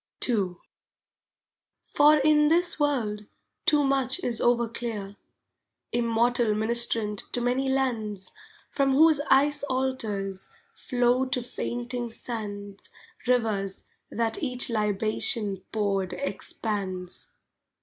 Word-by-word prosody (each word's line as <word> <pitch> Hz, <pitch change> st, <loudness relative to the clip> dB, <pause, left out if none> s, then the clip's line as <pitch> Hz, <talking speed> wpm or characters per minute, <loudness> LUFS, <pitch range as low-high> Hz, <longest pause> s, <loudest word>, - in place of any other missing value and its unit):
II 200 Hz, -7 st, 0 dB, 1.3 s
For 300 Hz, +1 st, +5 dB
in 300 Hz, +1 st, +4 dB
this 345 Hz, +1 st, +2 dB
world 220 Hz, -8 st, -1 dB, 0.4 s
too 300 Hz, -3 st, +5 dB
much 270 Hz, +1 st, +1 dB
is 235 Hz, -2 st, 0 dB
overclear, 230 Hz, -4 st, -1 dB, 0.8 s
Immortal 235 Hz, -1 st, +1 dB
Ministrant 220 Hz, -1 st, +1 dB
to -, -, +1 dB
many 250 Hz, +3 st, 0 dB
lands, 225 Hz, -7 st, -2 dB, 0.4 s
From 275 Hz, -1 st, +1 dB
whose 310 Hz, +1 st, +5 dB
ice 290 Hz, +2 st, +4 dB
altars 220 Hz, -8 st, -3 dB, 0.2 s
flow 250 Hz, 0 st, +1 dB
to 255 Hz, -1 st, -2 dB
fainting 240 Hz, 0 st, -4 dB
sands 205 Hz, -4 st, -7 dB, 0.4 s
Rivers 215 Hz, -6 st, 0 dB, 0.3 s
that 225 Hz, -1 st, -2 dB
each 250 Hz, -4 st, +2 dB
libation 210 Hz, -1 st, +1 dB
poured 195 Hz, -4 st, -1 dB
expands. 185 Hz, 0 st, -4 dB
235 Hz, 95 wpm, -26 LUFS, 210-265 Hz, 1.3 s, For